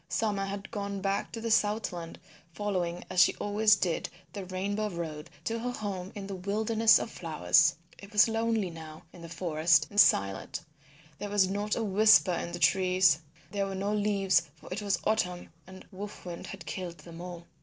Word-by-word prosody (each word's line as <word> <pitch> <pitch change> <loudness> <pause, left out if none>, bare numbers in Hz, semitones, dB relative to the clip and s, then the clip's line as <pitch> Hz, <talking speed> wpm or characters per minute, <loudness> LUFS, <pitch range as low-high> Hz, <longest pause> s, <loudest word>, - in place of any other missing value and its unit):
Summer 205 -3 0
had 200 +1 -6
gone 200 -2 -4
back 195 +1 -1
to 230 - -6
the 230 0 -3
Southland 205 -6 0 0.4
following 180 -4 -2
as 180 - +3
she - - +5
always 210 +1 +3
did 175 -5 -1 0.2
the 195 -3 -6
Rainbow 200 +3 -2
Road 165 -3 -6
to 230 +6 -2
her 245 +2 -3
home 200 -5 -5
in 200 -1 -6
the 195 - -6
Wilderness 215 +4 +3
of - - -4
Flowers. 160 -4 +3 0.2
It 200 +1 -12
was 210 +1 +6
lonely 225 -4 0
now 160 -1 -10
in 175 - -13
the 170 - -9
forest 160 -2 +2
and 205 - 0
silent; 100 - +3 0.6
there 205 - -4
was 200 -2 +3
not 205 +2 -1
a 230 - -1
whisper 205 -2 +5
in 170 - -3
the 175 - -4
trees; 185 -1 +4 0.3
there 200 -1 -1
were 195 - -5
no 200 +2 -1
leaves, 200 -2 +2
for 160 - -9
it 205 - -4
was 200 -1 0
autumn 180 -5 -1 0.2
and 190 0 -12
Wolf 205 +1 -8
Wind 175 -1 -7
had 195 - -9
killed 180 -3 -5
them 165 +2 -11
all. 175 -1 -8
195 Hz, 185 wpm, -29 LUFS, 175-210 Hz, 0.6 s, was